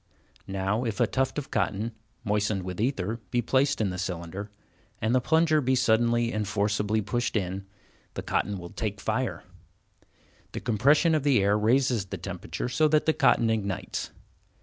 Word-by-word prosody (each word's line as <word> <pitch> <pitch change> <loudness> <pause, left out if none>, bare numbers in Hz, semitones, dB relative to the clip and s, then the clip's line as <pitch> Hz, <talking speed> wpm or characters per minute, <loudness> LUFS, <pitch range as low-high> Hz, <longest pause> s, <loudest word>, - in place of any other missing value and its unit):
Now 95 +4 -1
if 110 -5 -3
a - - +5
tuft 130 +2 -1
of 145 - -4
cotton, 105 +1 -1 0.3
moistened 105 -2 0
with 90 +2 -4
ether, 115 -3 -1
be 120 - 0
placed 135 +4 +2
in 105 -4 +1
the 90 - -5
cylinder, 95 +2 -4 0.5
and 110 +2 0
the 130 - +3
plunger 160 +2 +3
be 130 0 +2
suddenly 120 0 +2
and 105 -1 -1
forcibly 105 +1 0
pushed 120 +3 -1
in, 95 0 -3 0.5
the - - -4
cotton 100 -1 -1
will 85 -1 -9
take - - -3
fire. - - -2 1.1
The - - -3
compression 140 - +3
of 155 - +2
the 135 -8 +3
air 100 +1 +3
raises 120 0 +2
the 95 - -6
temperature - - -5
so 155 +5 +2
that 155 0 +2
the 160 - +3
cotton 135 -6 +3
ignites. 100 -4 -3
110 Hz, 170 wpm, -27 LUFS, 100-130 Hz, 1.1 s, a